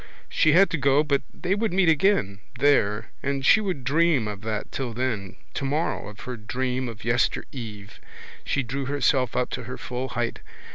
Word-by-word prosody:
She 155 - +3
had 195 +4 +6
to 165 - -1
go 140 +2 +4
but 140 -2 +1
they 185 - -2
would 215 +1 0
meet 185 -1 +3
again, 160 - +3 0.2
there, 115 -7 +2
and 140 -1 -2
she 220 - +6
would 185 -10 -3
dream 150 -3 +2
of 100 -2 -5
that 110 -1 -4
till 125 -4 -3
then, 110 -6 -2 0.2
tomorrow, 145 0 -1
of 105 -1 -10
her 125 -1 -6
dream 125 +3 -2
of 115 -2 -9
yester 120 +1 +1
eve. 105 -5 -8 0.4
She 140 - 0
drew 135 +3 -3
herself 135 -2 +1
up 125 0 0
to 125 - -4
her 125 - -6
full 125 +1 -4
height. 120 0 -2
130 Hz, 185 wpm, -25 LUFS, 115-145 Hz, 0.4 s, had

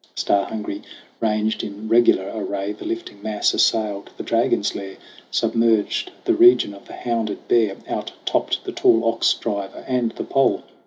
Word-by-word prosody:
Star 100 -1 +1
hungry, 105 -2 -5 0.4
ranged 110 -1 0
in 105 +2 -7
regular 115 -4 +4
array, 100 -2 -3
The 105 - -9
lifting 115 -3 -5
mass 105 -1 0
assailed 105 -3 +1
the - - -5
Dragon's - - +1
lair, 95 -1 -7 0.3
Submerged 115 - +1 0.2
the 355 - +3
region 345 - +6
of 100 - -14
the - - -11
hounded 115 -4 -3
Bear, 110 -5 +3
Out - - -4
topped - - 0
the - - -5
tall 115 +1 +3
Ox 115 0 +2
Driver 100 -3 -5
and 125 -3 0
the - - -5
Pole. 135 0 +1
110 Hz, 160 wpm, -22 LUFS, 100-115 Hz, 0.4 s, region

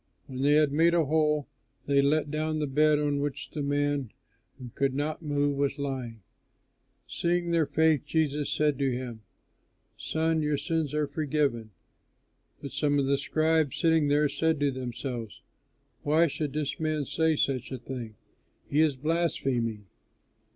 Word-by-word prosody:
When 130 0 -6
they 145 +2 +4
had 150 -1 +4
made 165 +4 +3
a 165 -2 +3
hole, 150 -1 +1 0.4
they 140 -1 +3
let 145 +1 +1
down 155 0 -1
the 150 - 0
bed 150 +2 +3
on 145 -1 0
which 145 -1 -4
the 150 - -4
man 145 -3 0 0.5
who 125 -3 -9
could 135 -1 0
not 150 +3 -2
move 145 -2 0
was 140 0 0
lying. 130 -6 -5 0.8
Seeing 175 0 -1
their 165 -3 +2
faith, 160 -2 +2
Jesus 150 -1 0
said 150 -2 +1
to 135 -1 +1
him, 120 -3 -5 0.8
"Son, 160 0 0
your 150 -1 0
sins 150 0 -2
are 150 0 +1
forgiven." 145 -7 -1 0.9
But 140 - -5
some 145 -1 +1
of 140 - +2
the 140 +1 +2
scribes 155 -1 +1
sitting 160 -3 +3
there 145 +1 +3
said 160 +2 0
to 145 -1 +2
themselves, 125 -3 -5 0.6
"Why 155 +3 +3
should 150 -2 -3
this 150 -2 -2
man 155 -2 -1
say 160 +3 +1
such 135 -3 -1
a 130 - -3
thing? 120 -3 -7 0.5
He 145 +2 +2
is 155 -3 +3
blaspheming! 130 -8 -1
145 Hz, 160 wpm, -28 LUFS, 135-155 Hz, 0.9 s, they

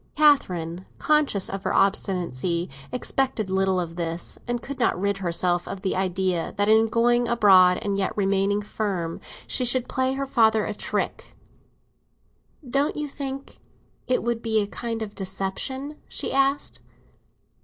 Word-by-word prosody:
Catherine, 185 - +2
conscious 300 -11 +2
of 195 0 -5
her - - -1
obstinacy, 180 -4 0 0.2
expected 250 -4 -1
little 190 -1 +2
of 170 -1 -5
this, 170 0 -3
and 240 0 -1
could 275 +3 -7
not 230 -6 +2
rid 200 0 0
herself 175 -1 0
of 195 - -6
the 190 - 0
idea 185 -2 -1
that 205 0 +2
in 220 +1 +5
going 240 +1 +2
abroad 195 -6 +6
and 200 -1 -1
yet 195 - -1
remaining 200 +1 +1
firm, 190 -6 -3 0.3
she 255 - +1
should 250 0 +2
play 260 0 0
her 275 +1 -2
father 220 -4 +3
a 215 - -3
trick. - - -3 1.3
"Don't 275 +4 +1
you 300 0 -3
think 275 -1 -6 0.5
it 255 - +1
would 235 -1 -1
be 220 -2 +1
a 205 - +1
kind 230 +2 -4
of 205 -1 -7
deception?" 195 +10 -4
she - - -3
asked. 275 +1 +1
205 Hz, 150 wpm, -25 LUFS, 185-245 Hz, 1.3 s, abroad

